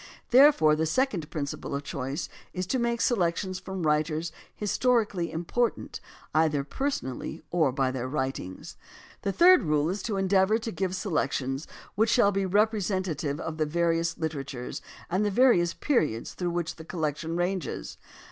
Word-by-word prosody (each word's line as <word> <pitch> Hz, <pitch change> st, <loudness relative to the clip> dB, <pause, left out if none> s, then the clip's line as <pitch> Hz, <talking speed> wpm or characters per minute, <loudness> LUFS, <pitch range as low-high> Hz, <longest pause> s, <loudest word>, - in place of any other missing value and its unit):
Therefore 245 Hz, -, +6 dB
the 160 Hz, +1 st, 0 dB
second 185 Hz, -, 0 dB
principle 145 Hz, -3 st, -4 dB
of 140 Hz, -, -3 dB
choice 140 Hz, +3 st, -4 dB, 0.3 s
is 185 Hz, 0 st, -2 dB
to 255 Hz, +8 st, -1 dB
make 235 Hz, 0 st, 0 dB
selections 185 Hz, -3 st, 0 dB
from 190 Hz, -2 st, -5 dB
writers 155 Hz, +2 st, 0 dB, 0.2 s
historically 210 Hz, -5 st, +1 dB
important 175 Hz, +9 st, -2 dB, 0.3 s
either 155 Hz, -3 st, +2 dB
personally 160 Hz, -, -4 dB
or 160 Hz, -6 st, +3 dB
by 130 Hz, 0 st, 0 dB
their 130 Hz, -1 st, -3 dB
writings. 130 Hz, -9 st, -4 dB, 0.4 s
The 200 Hz, -, -1 dB
third 360 Hz, -, +7 dB
rule 150 Hz, -1 st, +1 dB
is 200 Hz, -, -4 dB
to 205 Hz, -, -1 dB
endeavor 195 Hz, +2 st, +3 dB
to 225 Hz, 0 st, -5 dB
give 185 Hz, +1 st, -2 dB
selections 140 Hz, -, -1 dB, 0.3 s
which 220 Hz, +2 st, +2 dB
shall 205 Hz, -5 st, +4 dB
be 195 Hz, -1 st, 0 dB
representative 185 Hz, -7 st, 0 dB
of 160 Hz, -1 st, -5 dB
the 155 Hz, -1 st, 0 dB
various 165 Hz, 0 st, 0 dB
literatures 140 Hz, -6 st, -4 dB, 0.3 s
and 185 Hz, +4 st, 0 dB
the 210 Hz, -, +2 dB
various 195 Hz, -6 st, +4 dB
periods 150 Hz, -, 0 dB
through 180 Hz, -1 st, -2 dB
which 170 Hz, -1 st, -3 dB
the 160 Hz, -, -9 dB
collection 160 Hz, -1 st, -3 dB
ranges. 180 Hz, +1 st, -3 dB
170 Hz, 150 wpm, -27 LUFS, 150-200 Hz, 0.4 s, third